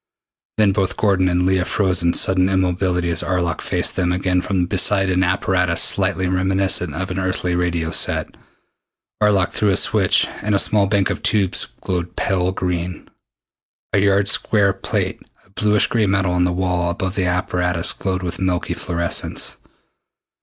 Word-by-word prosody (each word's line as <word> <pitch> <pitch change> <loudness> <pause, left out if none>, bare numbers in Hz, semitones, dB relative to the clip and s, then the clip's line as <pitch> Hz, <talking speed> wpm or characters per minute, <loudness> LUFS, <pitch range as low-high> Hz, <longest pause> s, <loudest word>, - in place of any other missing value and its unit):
Then 105 -2 +4
both 95 -1 -1
Gordon 95 -3 +2
and 90 0 0
Leah 95 -1 +2
froze 95 -2 0
into 85 0 +1
sudden 95 0 +2
immobility 90 -2 0
as 85 - +1
Arlok 85 -1 -2
faced - - -1
them 90 -1 0
again 90 0 0
from 90 -2 -1
beside 95 +1 +2
an 90 0 +1
apparatus 90 -2 +1
slightly 95 -1 +2
reminiscent 95 -3 0
of 95 +2 -4
an 90 - -3
earthly 90 -1 -2
radio 85 -2 -1
set. - - 0 0.9
Arlok 100 -4 +2
threw 105 - 0
a 95 - +2
switch, - - +3 0.2
and 105 0 0
a - - +4
small 100 0 +2
bank 100 -1 +1
of - - -5
tubes 100 -4 +1 0.2
glowed 90 -2 -4
pale 90 -2 0
green. 90 -1 -4 0.8
A - - +3
yard 100 0 +2
square 100 -2 +2
plate 95 - -3 0.2
of 95 - -29
bluish 105 0 +2
gray 110 -4 0
metal 95 -1 0
on 90 0 +1
the 90 - 0
wall 90 -1 -1
above 95 +1 -3
the 95 -3 -1
apparatus 90 -1 0
glowed 95 -1 -3
with 90 - -5
milky 95 -2 -1
fluorescence. 85 -1 -2
95 Hz, 165 wpm, -19 LUFS, 90-95 Hz, 0.9 s, Then